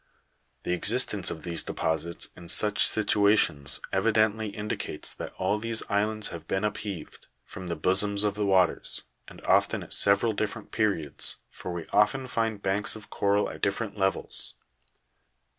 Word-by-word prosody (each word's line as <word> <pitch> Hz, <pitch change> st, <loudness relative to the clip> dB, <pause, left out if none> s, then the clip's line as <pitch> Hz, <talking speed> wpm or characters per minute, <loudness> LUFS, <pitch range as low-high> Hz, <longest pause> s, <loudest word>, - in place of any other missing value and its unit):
The 90 Hz, -, -1 dB
existence 90 Hz, -, +2 dB
of 80 Hz, -, -7 dB
these 85 Hz, -1 st, -2 dB
deposits 80 Hz, +1 st, -2 dB
in 85 Hz, -1 st, -12 dB
such 105 Hz, +3 st, +5 dB
situations 100 Hz, -9 st, +3 dB
evidently 110 Hz, +2 st, +2 dB
indicates 105 Hz, +1 st, -4 dB
that -, -, -7 dB
all 100 Hz, +3 st, 0 dB
these 115 Hz, 0 st, 0 dB
islands 105 Hz, +1 st, 0 dB
have 85 Hz, -2 st, -9 dB
been 95 Hz, +2 st, -1 dB
upheaved 105 Hz, -5 st, -5 dB, 0.2 s
from 90 Hz, -1 st, -9 dB
the 85 Hz, -, -3 dB
bosom 95 Hz, +5 st, +1 dB
of 105 Hz, -, +1 dB
the 105 Hz, 0 st, -2 dB
waters, 95 Hz, -2 st, +1 dB, 0.2 s
and -, -, -13 dB
often -, -, +2 dB
at -, -, -5 dB
several 100 Hz, +3 st, +4 dB
different 110 Hz, +1 st, -4 dB
periods, 100 Hz, -10 st, +2 dB
for 90 Hz, -, -7 dB
we 85 Hz, -1 st, -5 dB
often 105 Hz, +6 st, +2 dB
find 115 Hz, -4 st, -2 dB
banks 100 Hz, +3 st, +1 dB
of 110 Hz, -2 st, -12 dB
coral 100 Hz, +1 st, +1 dB
at -, -, -9 dB
different 100 Hz, +1 st, -2 dB
levels. 95 Hz, -2 st, -2 dB
100 Hz, 150 wpm, -27 LUFS, 90-110 Hz, 0.2 s, such